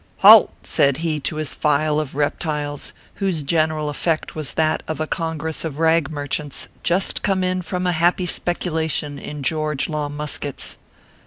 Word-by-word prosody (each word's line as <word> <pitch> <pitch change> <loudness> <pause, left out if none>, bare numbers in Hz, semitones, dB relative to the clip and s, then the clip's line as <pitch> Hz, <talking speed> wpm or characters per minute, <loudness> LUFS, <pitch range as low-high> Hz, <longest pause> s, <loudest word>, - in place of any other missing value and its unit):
" - - -36
Halt - - +10
!" - - -32
said 140 -1 +2
he 155 -2 0
to 150 +3 -2
his 155 -3 -1
file 150 +1 +1
of 145 -3 -4
reptiles, 145 0 -2 0.3
whose 180 -6 0
gen 155 +2 +2
eral 155 -1 -3
effect 155 +2 -1
was 155 -3 -3
that 155 -1 +1
of 160 - -3
a 155 - 0
congress 160 0 -2
of 155 -4 -4
rag 160 -2 +3
merchants 145 -1 -3
just 180 +3 +1
come 190 -2 +1
in 185 0 0
from 180 +1 -3
a 180 - +2
happy 175 +2 +2
speculation 160 -5 -1
in 145 0 -7
George 150 -1 -1
Law 150 -2 -2
muskets. 145 -1 -3
155 Hz, 175 wpm, -21 LUFS, 145-165 Hz, 0.3 s, Halt